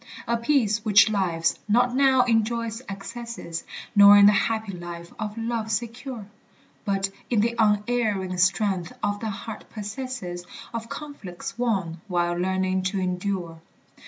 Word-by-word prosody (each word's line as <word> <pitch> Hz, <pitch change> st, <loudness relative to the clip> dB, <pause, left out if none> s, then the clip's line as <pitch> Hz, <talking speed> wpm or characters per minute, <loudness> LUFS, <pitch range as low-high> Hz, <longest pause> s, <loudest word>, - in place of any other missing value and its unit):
A 235 Hz, -, +2 dB
peace 230 Hz, -4 st, +1 dB
which 215 Hz, 0 st, +6 dB
lives 170 Hz, -5 st, 0 dB
not 245 Hz, +3 st, +3 dB
now 265 Hz, -1 st, +5 dB
in 225 Hz, -2 st, +3 dB
joy's 230 Hz, 0 st, -3 dB
excesses, 200 Hz, -3 st, -6 dB, 0.3 s
Nor 200 Hz, 0 st, +9 dB
in 200 Hz, -, +8 dB
the 205 Hz, -, +8 dB
happy 220 Hz, 0 st, 0 dB
life 175 Hz, -1 st, -8 dB
of 215 Hz, 0 st, -4 dB
love 225 Hz, -1 st, -2 dB
secure, 235 Hz, +1 st, -4 dB, 0.6 s
But 195 Hz, -1 st, 0 dB, 0.2 s
in 230 Hz, -4 st, +3 dB
the 235 Hz, +2 st, +1 dB
unerring 210 Hz, -3 st, +1 dB
strength 190 Hz, -1 st, +1 dB
the 205 Hz, +2 st, -1 dB
heart 215 Hz, +2 st, -7 dB
possesses, 210 Hz, -4 st, -5 dB, 0.3 s
Of 230 Hz, 0 st, -5 dB
conflicts 285 Hz, -13 st, -7 dB
won, 190 Hz, -9 st, -1 dB
while 175 Hz, -2 st, +1 dB
learning 185 Hz, +1 st, 0 dB
to 195 Hz, -, -2 dB
endure. 180 Hz, -2 st, -3 dB
210 Hz, 135 wpm, -25 LUFS, 185-230 Hz, 0.6 s, Nor